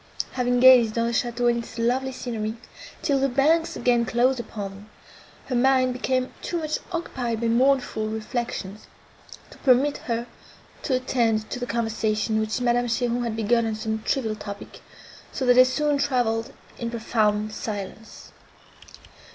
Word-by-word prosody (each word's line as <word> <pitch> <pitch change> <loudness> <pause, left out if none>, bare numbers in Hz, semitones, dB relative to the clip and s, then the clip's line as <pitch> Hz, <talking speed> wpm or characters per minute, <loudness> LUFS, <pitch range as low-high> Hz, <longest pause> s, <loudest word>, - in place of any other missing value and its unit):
Having 245 -1 0
gazed 245 -4 +7
on 230 - +2
the 235 - -1
château 240 +1 0
and 235 0 +1
its 230 - -12
lovely 250 +3 0
scenery, 225 -4 -4 0.5
till 275 -2 +2
the 275 +1 +2
banks 320 +6 +2
again 240 -1 +2
closed 245 +2 +1
upon 210 -4 -5
them, 200 +2 -14 0.6
her - - -5
mind 255 0 +3
became 255 0 -1
too 345 - -3
much 310 -2 -2
occupied 250 -9 -3
by 235 - 0
mournful 245 -2 +2
reflections, 220 -2 -4 0.6
to - - -15
permit 270 +2 +3
her 235 0 -1 0.6
to 265 - 0
attend 230 -4 0
to 250 - -3
the 245 - -4
conversation, 220 -1 0
which 220 +3 -1
Madame 245 0 +2
Cheron 240 +1 0
had 230 -2 -2
begun 225 +1 +1
on 220 - -2
some 220 0 -3
trivial 220 -2 -1
topic, 200 -1 -9 0.5
so 265 - -3
that 250 - +6
they 255 +1 +8
soon 290 +3 0
travelled 245 -5 0 0.3
in 235 - -3
profound 215 -2 0
silence. 215 +1 -7
240 Hz, 155 wpm, -24 LUFS, 220-255 Hz, 0.6 s, they